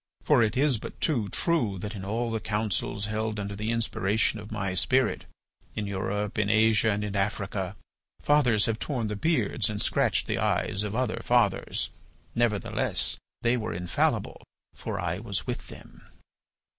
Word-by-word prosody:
For - - +5
it 110 +1 +2
is 135 -4 +3
but - - -8
too 120 -10 +1
true 120 - +1
that 105 +3 -5
in 100 -3 -6
all 115 +4 -1
the 115 - -1
councils 105 -2 -1
held 110 0 -2
under 100 0 -4
the 105 +2 -3
inspiration 110 -1 +1
of 105 +1 -10
my 100 -3 -2
spirit, 125 +9 +2 0.5
in 105 - -2
Europe, 100 +2 -2
in 100 -1 +2
Asia, 110 0 +4
and 105 0 0
in 105 -1 -3
Africa, 100 -1 -1 0.4
fathers 125 -8 +4
have 110 -1 -1
torn 120 -7 -2
the 105 - -2
beards 115 - +1
and 105 -1 -3
scratched - - +2
the - - -1
eyes 95 - +1
of 105 0 -3
other 130 +1 0
fathers. - - +1 0.4
Nevertheless 115 -4 0 0.3
they 120 +1 +3
were 110 -2 -3
infallible, 90 0 0 0.3
for - - -4
I - - -1
was - - -3
with - - -4
them." - - -13
105 Hz, 165 wpm, -28 LUFS, 100-115 Hz, 0.5 s, For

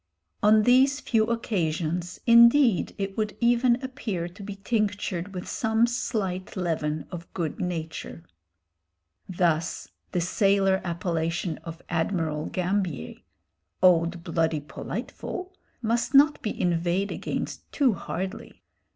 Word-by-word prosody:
On 215 0 +5
these 265 +4 +4
few 225 -6 +2
occasions 175 -6 -2
indeed 235 -2 +6
it 195 -1 -3
would 215 -2 -2
even 240 0 +4
appear 220 -10 -3
to 180 +4 -13
be 200 0 -6
tinctured 205 -3 -2
with 180 -2 -6
some 225 0 +2
slight 205 -6 -3
leaven 155 -4 -1
of 170 -1 -8
good 165 -5 -3
nature. 165 -2 -4 1.1
Thus, 170 -2 0 0.2
the 180 - 0
sailor 195 +1 +2
appellation 170 -1 -2
of 165 0 -9
Admiral 160 -3 -1
Gambier 185 - -2 0.7
"old 170 -1 +4
bloody 165 -2 0
Politeful" 365 - -6 0.3
must 235 +4 0
not 295 +2 +6
be 210 - -4
inveighed 175 +3 0
against - - -5
too 270 -6 +3
hardly. 190 +2 -6
190 Hz, 115 wpm, -26 LUFS, 170-220 Hz, 1.1 s, indeed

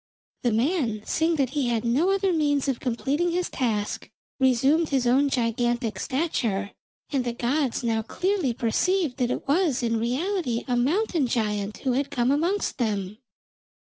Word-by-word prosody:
The 240 - +1
man 230 - 0
seeing 325 +1 +1
that 270 -4 0
he 285 -3 0
had 235 -1 0
no 275 +11 +2
other 390 -1 +2
means 290 -4 +1
of 265 -3 -1
completing 275 +7 0
his 355 +1 -1
task, 215 -5 -2 0.3
resumed 265 +5 +3
his 265 -3 +1
own 270 +4 +3
gigantic 240 -3 0
stature, 230 - -1 0.4
and 275 -3 +1
the 240 -1 -2
gods 255 +2 -1
now 225 -2 +1
clearly 360 - -1
perceived 280 - 0
that 250 -2 0
it - - -3
was 290 -4 +2
in 230 -1 +1
reality 255 - -1
a 250 - +1
Mountain 310 - +1
giant 210 -3 -1
who 265 - 0
had 275 +3 0
come 245 0 +1
amongst 340 +4 0
them. 210 -3 -2
255 Hz, 160 wpm, -25 LUFS, 235-310 Hz, 0.4 s, resumed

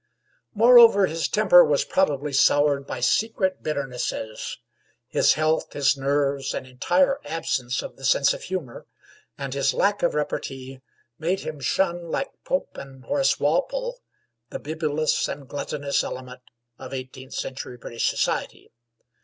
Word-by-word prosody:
Moreover, 230 -3 +7
his 165 -1 -2
temper 190 -4 +6
was 150 -3 +1
probably 150 -6 0
soured 140 0 +3
by 125 - -5
secret 195 - +1
bitternesses. 125 -6 -4 0.5
His - - +3
health, 155 +1 0
his 140 0 +2
nerves, 140 0 -1
an - - -4
entire 270 - +1
absence 130 -6 -2
of - - -9
the 135 - -15
sense 135 +1 +3
of - - -8
humor, 180 -10 -6 0.5
and 135 -2 -5
his 140 -1 +1
lack 205 0 +1
of 170 - +1
repartee, 135 -3 -4 0.4
made 175 +4 -1
him 155 -1 -6
shun 170 +3 -1
like 275 - -2
Pope - - -2
and 135 -1 -12
Horace 280 -1 +1
Walpole - - -1 0.5
the - - -5
bibulous 155 0 -1
and 140 -1 -7
gluttonous 145 0 -2
element 125 0 -7 0.4
of - - -7
eighteenth 130 0 -8
century 130 -2 -5
British 115 -1 -2
society. - - -2
145 Hz, 135 wpm, -24 LUFS, 135-185 Hz, 0.5 s, Moreover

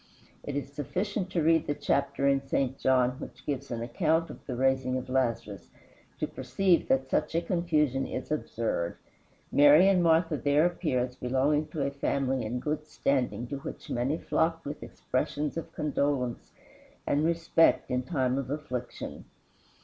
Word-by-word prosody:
It 145 - -5
is 140 0 -4
sufficient 185 - -2
to 175 -4 0
read 160 0 +3
the 145 - 0
chapter 140 0 0
in 140 -1 +3
St. 135 -1 -1
John 130 -1 +3
which - - -10
gives 140 -3 -3
an 115 -1 -3
account 160 +7 +1
of - - -12
the 125 - -3
raising 130 0 +1
of 130 - -6
Lazarus, 115 -7 -1 0.5
to - - -1
perceive 185 -3 +1
that 130 0 +2
such 145 - 0
a 165 - +3
confusion 150 -7 +1
is 130 - -5
absurd. 115 - -2 0.5
Mary 145 +6 +7
and 190 -2 +4
Martha 165 -1 +3
there 145 +3 +3
appear 170 -7 0
as 125 0 -3
belonging 135 +4 +1
to 150 -2 -2
a 140 - -1
family 135 -2 -1
in 120 +3 -3
good 150 +2 -3
standing 130 -5 0
to 140 - -4
which - - -8
many 130 +6 0
flocked 165 0 0
with 145 +1 -6
expressions 145 +3 -2
of 165 - -5
condolence 140 -5 -1 0.5
and 145 +1 +1
respect 165 -2 +3
in 125 0 +1
time 130 -3 0
of 130 -2 -5
affliction. 130 -5 -5
140 Hz, 165 wpm, -29 LUFS, 130-160 Hz, 0.5 s, Mary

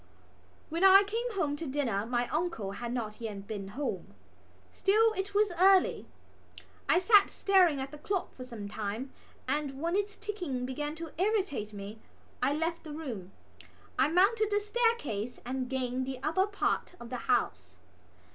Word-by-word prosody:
When 335 +4 -1
I 390 +1 +9
came 455 +4 -3
home 300 -8 0
to 320 - -5
dinner 240 -7 -1
my 240 0 0
uncle 310 - -2
had 235 +4 -5
not 225 -3 -4
yet 205 -3 -5
been 200 -2 -5
home. 200 - -4 0.6
Still 435 +3 +3
it 400 0 -4
was 415 -1 +3
early. 380 0 +5 0.8
I - - +6
sat 400 +2 +6
staring 365 -7 +3
at 265 +1 -4
the 300 - -10
clock 385 +4 -2
for 255 - -9
some 230 -5 -7
time 215 +5 -4 0.3
and, 280 0 -1
when 335 +4 0
its 410 +1 -1
ticking 360 -12 -4
began 295 +4 -3
to 325 -1 -7
irritate 380 - 0
me, 205 +1 -8 0.4
I - - +3
left 330 +3 -1
the 310 -2 -7
room. 235 - -6 0.7
I 265 - +5
mounted 400 +6 +3
the 415 0 +2
staircase 415 - -1
and 255 0 -3
gained 260 -1 -2
the 265 -1 -4
upper 375 +6 +2
part 410 -3 -1
of 235 - -10
the 250 - -2
house. - - 0
295 Hz, 165 wpm, -30 LUFS, 245-390 Hz, 0.8 s, I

